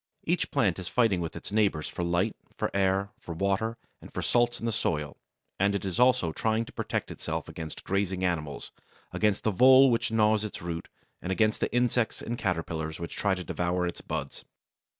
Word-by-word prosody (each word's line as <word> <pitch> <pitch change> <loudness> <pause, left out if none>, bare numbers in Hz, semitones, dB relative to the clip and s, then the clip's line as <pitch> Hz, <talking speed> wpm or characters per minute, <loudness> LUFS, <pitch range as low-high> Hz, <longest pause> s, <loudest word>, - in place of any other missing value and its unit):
Each 175 +2 0
plant 105 -11 +1
is 90 - -6
fighting 110 -6 +2
with 85 - -4
its - - -8
neighbours 100 -7 +1
for - - -5
light, 90 +5 +1 0.2
for - - -1
air, 95 +1 +2
for 85 - -7
water, 100 +5 0 0.2
and - - -12
for - - -4
salts 120 0 +2
in - - -5
the 115 - +1
soil, 75 -9 -1 0.4
and 100 +1 +3
it 100 - -2
is 95 +1 -2
also 125 -9 +4
trying 110 +6 0
to - - -13
protect - - -3
itself - - -4
against 80 -2 -7
grazing 95 -1 -1
animals, 75 -5 -3 0.4
against 105 -2 +1
the 110 - +2
vole 130 +5 +7
which 115 -1 0
gnaws 110 -1 +3
its 105 - -5
roots, 85 -1 -5 0.3
and 95 - -3
against 110 +2 +2
the - - -1
insects 120 -1 +1
and 120 +1 -4
caterpillars 80 -5 -2
which 85 - -6
try 100 -2 +1
to 90 - -5
devour 90 +2 -1
its 85 - -4
buds. - - -5
100 Hz, 195 wpm, -28 LUFS, 85-115 Hz, 0.4 s, vole